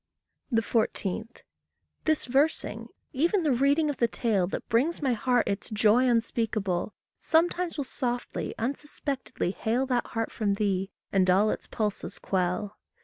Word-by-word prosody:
14. 220 -2 -1 0.8
This 315 -1 +2
versing, 275 +5 0 0.3
even 340 +7 +2
the 300 - +2
reading 280 +5 +3
of 290 - -2
the 235 - +3
tale 210 -7 +1
That - - -5
brings 270 +10 +2
my 270 -4 +1
heart 245 +1 +1
its 200 +4 -2
joy 220 +3 +4
unspeakable, 215 -5 0 0.2
Sometimes 345 +1 +1
will 285 - 0
softly, 245 -2 -3
unsuspectedly 275 -4 -3
hale 235 +6 0
That 250 -2 0
heart 225 0 -2
from 205 -3 0
thee, 195 -2 0 0.2
and 185 -2 +3
all 200 +4 +4
its - - -5
pulses 210 -2 -3
quell. 190 +2 -1
235 Hz, 140 wpm, -28 LUFS, 205-275 Hz, 0.8 s, joy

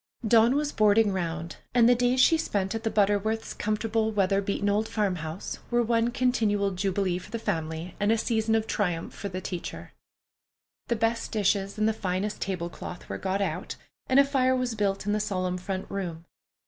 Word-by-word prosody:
Dawn 230 +3 +5
was 295 0 0
"boarding 215 0 +4
round," 170 -2 -3 0.2
and 235 -1 +6
the 245 - +7
days 245 +1 +2
she 325 - +6
spent 200 -11 -1
at 225 - -3
the 225 - -1
Butterworths' 210 +1 +1
comfortable, 220 +1 0
weather 195 -1 +2
beaten 200 +1 -1
old 210 +2 +1
farmhouse 180 -5 -3
were 240 0 +2
one 230 0 +2
continual 220 -5 +1
jubilee 185 -1 0
for 185 - -13
the 230 - -3
family, 160 -3 -3
and 205 +1 +2
a 225 - +3
season 225 -1 +1
of 220 -1 +1
triumph 175 -7 -2
for 200 - -5
the 185 0 -5
teacher. 180 -2 -6 0.9
The 235 - +1
best 225 +1 -1
dishes 200 -1 0
and 215 0 +2
the 220 - +2
finest 200 0 -2
table 180 -3 -2
cloth 175 +1 -9
were - - -4
got 195 +1 -1
out, - - -3 0.3
and 260 - +5
a 280 - +7
fire 260 -2 +2
was 250 -2 -1
built 200 -2 -1
in 205 - 0
the 210 - +1
solemn 185 -3 -1
front 190 +1 -4
room. 175 -4 -5
205 Hz, 190 wpm, -27 LUFS, 190-225 Hz, 0.9 s, the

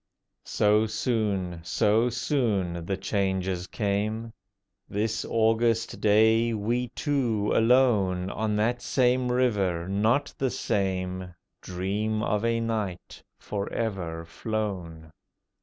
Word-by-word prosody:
So 105 +1 +3
soon, 105 -6 -1
so 105 +7 +2
soon, 100 - -1
the 95 - -1
changes 95 -2 -1
came. 110 +3 -2 0.6
This 110 +2 -1
August 115 0 +1
day 110 +2 +4
we 120 +4 -1
two 120 -8 0
alone, 105 -7 +3
On 110 0 -1
that 120 +3 0
same 125 0 +2
river, 100 -9 +1
not 110 +9 +1
the 135 - +1
same, 95 -5 -2 0.3
Dream 105 +4 -2
of 105 0 0
a 115 0 +1
night 110 -6 -4 0.2
for 100 -1 -4
ever 90 -7 -3
flown. 90 -5 -4
105 Hz, 105 wpm, -27 LUFS, 95-115 Hz, 0.6 s, day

